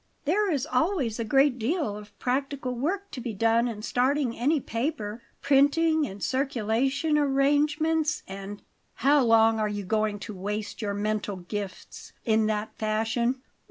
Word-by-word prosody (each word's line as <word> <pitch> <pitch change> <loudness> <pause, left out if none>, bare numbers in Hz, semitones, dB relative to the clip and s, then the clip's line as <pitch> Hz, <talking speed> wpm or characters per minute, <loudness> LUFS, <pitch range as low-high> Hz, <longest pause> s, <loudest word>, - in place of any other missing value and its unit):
There 390 +6 +2
is 280 -4 0
always 315 - 0
a - - 0
great 270 +3 +3
deal 265 - -1
of 210 -1 -12
practical 265 0 -2
work 370 +11 -2
to 255 - -6
be 230 -3 -4
done 230 +3 +3
in 215 -3 -6
starting 255 +1 +1
any 285 +6 +2
paper 230 -3 -3 0.2
printing 300 +3 +3
and 195 0 -8
circulation 270 +3 0
arrangements 295 +3 +2
and 195 +1 -8 0.2
" - - -44
"How 285 0 +5
long 225 -1 +4
are 215 -1 +1
you 205 -1 -4
going 215 +1 0
to 210 - -6
waste 205 +3 -4
your 205 -2 -2
mental 210 0 -2
gifts 190 +1 -7
in 220 -1 +3
that 215 0 -2
fashion?" 225 +4 0
240 Hz, 155 wpm, -27 LUFS, 215-285 Hz, 0.2 s, How